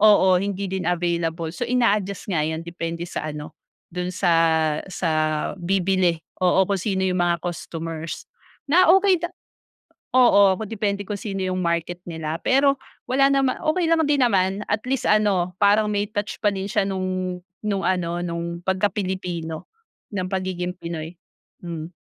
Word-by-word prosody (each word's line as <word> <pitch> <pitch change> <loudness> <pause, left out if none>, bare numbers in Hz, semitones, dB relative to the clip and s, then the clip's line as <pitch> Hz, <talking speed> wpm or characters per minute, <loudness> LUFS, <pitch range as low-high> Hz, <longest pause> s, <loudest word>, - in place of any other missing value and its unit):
oo, 190 -4 +6
hindi 200 0 -2
din 185 -2 -2
available 170 -2 -1
so 240 +6 -4
ina-adjust 210 -5 +1
nga 155 - +2
yan 160 +2 -2
depende 170 0 -4
sa 155 -2 -4
ano, 150 0 -7 0.4
do'n 180 0 -3
sa, 180 -1 +1 0.6
sa 180 -2 -2 0.5
bibili 185 -1 +2 0.2
oo 185 +1 +4
kung 195 -1 -1
sino 190 -1 0
yung 185 -1 +1
mga 175 -1 +1
customers 165 -2 -5 0.4
na 340 +5 +4
okey 385 -3 +3
da 345 - -2 0.8
Oo, 200 -7 +5
depende 205 -2 -2
kung 205 - -2
sino 195 -3 -4
yung 185 0 -1
market 170 +1 -1
nila 160 -1 -3
pero 275 +1 +4 0.3
wala 275 +2 +4
naman 270 -2 +1
okey 335 +3 +1
lang 330 -1 +3
din 290 -1 +3
naman 195 -3 +2
at 205 +1 0
least 270 -1 0
ano 200 -4 +2
parang 205 +1 +5
may 205 0 -1
touch 205 0 -3
pa 210 - +4
din 195 -1 -3
siya 210 +1 +1
nung, 185 -1 -2 0.3
nung 200 -2 -1
ano 175 -2 0
nung 170 0 -4
pagka 190 +2 +2
Pilipino 180 -5 -4 0.4
ng 190 -3 -2
pagiging 185 -2 -2
Pinoy, 170 -2 -6 0.5
hmm. 170 -1 -6
185 Hz, 155 wpm, -23 LUFS, 170-205 Hz, 0.8 s, oo